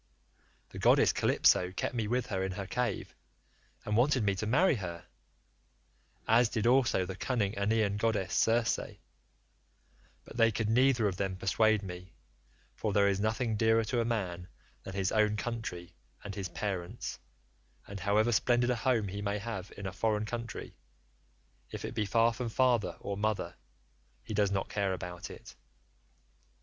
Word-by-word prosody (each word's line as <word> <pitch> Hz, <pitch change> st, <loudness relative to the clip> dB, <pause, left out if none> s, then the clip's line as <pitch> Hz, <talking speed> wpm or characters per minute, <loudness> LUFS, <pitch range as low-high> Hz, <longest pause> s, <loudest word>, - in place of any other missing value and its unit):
The -, -, -9 dB
goddess -, -, +5 dB
Calypso 90 Hz, 0 st, +3 dB
kept 95 Hz, -, -3 dB
me 115 Hz, -3 st, -1 dB
with 125 Hz, +2 st, 0 dB
her 95 Hz, -2 st, -2 dB
in 95 Hz, -1 st, -2 dB
her 100 Hz, +1 st, -5 dB
cave, 120 Hz, +1 st, -2 dB, 0.7 s
and 105 Hz, -, -1 dB
wanted 125 Hz, +1 st, +3 dB
me 100 Hz, -1 st, +2 dB
to 95 Hz, +3 st, -3 dB
marry 150 Hz, -, +3 dB
her, 85 Hz, -4 st, -6 dB, 1.2 s
as 115 Hz, +1 st, +5 dB
did 110 Hz, -1 st, -2 dB
also 120 Hz, -6 st, +3 dB
the 95 Hz, 0 st, -6 dB
cunning 105 Hz, -1 st, -1 dB
Aeaean 105 Hz, 0 st, +1 dB
goddess 105 Hz, -4 st, 0 dB
Circe; 115 Hz, 0 st, +2 dB, 1.5 s
but -, -, -11 dB
they 115 Hz, -1 st, +5 dB
could 110 Hz, 0 st, -1 dB
neither 125 Hz, -2 st, +4 dB
of 95 Hz, -3 st, -3 dB
them 95 Hz, -1 st, -2 dB
persuade 105 Hz, +2 st, +2 dB
me, 90 Hz, -1 st, -9 dB, 0.6 s
for 105 Hz, -2 st, -2 dB
there 100 Hz, -1 st, +4 dB
is 100 Hz, -1 st, +1 dB
nothing 110 Hz, +2 st, 0 dB
dearer 110 Hz, +1 st, +3 dB
to 120 Hz, +2 st, 0 dB
a -, -, +1 dB
man 90 Hz, -7 st, -3 dB, 0.3 s
than 95 Hz, +7 st, -8 dB
his 95 Hz, -2 st, 0 dB
own 105 Hz, -1 st, +3 dB
country 105 Hz, -7 st, -5 dB, 0.3 s
and 100 Hz, -, -6 dB
his 95 Hz, -2 st, -4 dB
parents, 90 Hz, -3 st, -4 dB, 0.7 s
and 100 Hz, 0 st, -8 dB
however 105 Hz, +5 st, +2 dB
splendid 120 Hz, +2 st, +2 dB
a -, -, +1 dB
home 115 Hz, -4 st, +1 dB
he 100 Hz, +2 st, -5 dB
may 100 Hz, 0 st, -1 dB
have 100 Hz, -3 st, -6 dB
in 100 Hz, -, -7 dB
a 95 Hz, -, -4 dB
foreign 105 Hz, +2 st, 0 dB
country, 115 Hz, +1 st, -6 dB, 0.9 s
if -, -, -6 dB
it -, -, -5 dB
be 105 Hz, -2 st, -1 dB
far 115 Hz, +3 st, +3 dB
from 120 Hz, 0 st, -4 dB
father 115 Hz, -7 st, +1 dB
or 100 Hz, -, -3 dB
mother, 105 Hz, -1 st, -2 dB, 0.7 s
he 110 Hz, -, -6 dB
does 100 Hz, -1 st, +2 dB
not 95 Hz, -1 st, -1 dB
care 100 Hz, -2 st, -1 dB
about 90 Hz, -1 st, -6 dB
it. -, -, -11 dB
105 Hz, 165 wpm, -31 LUFS, 95-115 Hz, 1.5 s, goddess